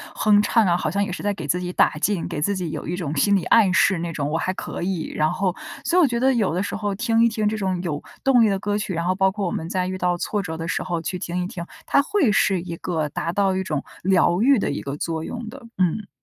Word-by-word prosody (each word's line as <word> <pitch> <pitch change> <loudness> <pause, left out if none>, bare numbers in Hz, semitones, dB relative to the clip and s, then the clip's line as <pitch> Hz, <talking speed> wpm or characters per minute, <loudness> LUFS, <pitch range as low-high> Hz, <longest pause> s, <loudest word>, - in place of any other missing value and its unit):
哼 210 -1 +4
唱 220 +1 +3
啊， 170 - +3
好 - - -1
像 200 +2 +1
也 200 - -3
是 180 - -5
在 205 0 +1
给 165 -6 -7
自 175 +5 +1
己 180 0 -4
打 - - +3
劲， 200 -5 0
给 150 - -4
自 200 +7 +1
己 180 -4 -3
有 - - -5
一 175 - -2
种 160 -5 -3
心 200 +8 +3
理 190 - +1
暗 205 -5 +5
示 190 0 +4
那 170 0 -3
种， 145 -2 -2
我 160 - 0
还 185 +3 -1
可 - - -6
以， 180 -3 -2
然 155 0 +2
后 185 -2 -1 0.3
所 350 - +2
以 - - +7
我 315 - +5
觉 235 -2 -1
得 265 +2 +3
有 215 -9 +1
的 180 +3 0
时 - - -4
候 205 -1 -2
听 230 +2 +2
一 235 - +5
听 215 -2 -1
这 215 +1 -1
种 190 -3 -1
有 155 -5 -3 0.2
动 265 -3 +5
力 220 - +4
的 195 -1 0
歌 205 +1 -1
曲， 205 -2 -3
然 170 0 -2
后 185 +1 +1
包 190 0 +3
括 200 0 -3
我 175 - -1
们 160 - -4
在 180 0 -1
遇 185 0 -3
到 180 -1 0
挫 205 +3 -2
折 160 -4 -5
的 165 0 -5
时 - - -1
候 175 -2 -2
去 180 +3 -3
听 175 +1 -3
一 - - -3
听， 170 -2 -6 0.2
它 280 - +4
会 315 - +2
是 195 -3 +2
一 170 -1 -6
个 160 -3 -2
达 165 - -3
到 195 +1 +1
一 190 - -1
种 155 -6 -2 0.2
疗 180 0 +3
愈 265 -1 +5
的 - - -1
一 145 - -3
个 140 +1 -5
作 160 0 -3
用 240 +3 -6
的。 270 +4 -11 0.2
嗯。 185 +3 0
185 Hz, 320 characters per minute, -23 LUFS, 170-210 Hz, 0.3 s, 以